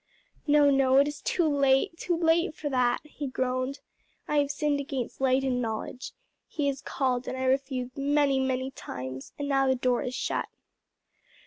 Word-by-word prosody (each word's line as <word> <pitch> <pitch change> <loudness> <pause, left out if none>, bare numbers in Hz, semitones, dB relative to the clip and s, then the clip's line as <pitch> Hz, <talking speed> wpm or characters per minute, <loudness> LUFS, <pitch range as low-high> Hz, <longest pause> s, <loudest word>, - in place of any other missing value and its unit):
"No, 290 -1 +5
no, 270 -1 +4
it 280 +1 +5
is 295 0 -6
too 345 -3 +1
late, 280 +1 +2
too 345 0 -1
late 330 0 +2
for 295 - -4
that!" 250 -2 +1
he 295 -1 -6
groaned. 255 +1 -2 0.5
"I 300 - 0
have 285 -1 +2
sinned 290 0 0
against 270 -3 -4
light 265 0 +3
and 250 -2 0
knowledge. 225 +2 -4 0.3
He 295 - -2
has 270 -1 -4
called 255 -2 -1
and 260 - -3
I 260 - -2
refused 260 -1 -1
many, 280 -1 +2
many 260 0 -1
times; 130 - -7
and 285 - -3
now 270 -1 +2
the 260 - +3
door 250 -1 +1
is 255 - -4
shut." - - -2
270 Hz, 180 wpm, -28 LUFS, 255-290 Hz, 0.5 s, No